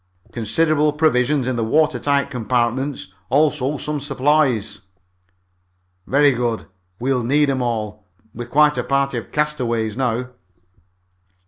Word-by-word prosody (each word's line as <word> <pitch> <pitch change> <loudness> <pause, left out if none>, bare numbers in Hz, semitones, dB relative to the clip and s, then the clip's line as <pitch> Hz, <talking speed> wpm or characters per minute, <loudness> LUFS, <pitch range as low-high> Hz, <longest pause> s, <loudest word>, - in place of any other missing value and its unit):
"Considerable 150 +7 +1
provisions 145 -3 +1
in 130 -2 -1
the 115 - 0
water 150 +8 +2
tight 140 -1 0
compartments. 125 -1 -2 0.2
Also 145 -1 +1
some 150 +1 -3
supplies." 135 -5 0 1.3
"Very 145 +1 +4
good. 120 -3 -2 0.3
We'll 130 0 0
need 140 +4 +2
'em 130 -1 -1
all. 105 -4 -3 0.3
We're 120 +1 -7
quite 150 +3 +3
a - - -1
party 140 -2 0
of - - -13
castaways 120 -8 -1
now." 125 -1 -1
130 Hz, 120 wpm, -20 LUFS, 120-150 Hz, 1.3 s, Very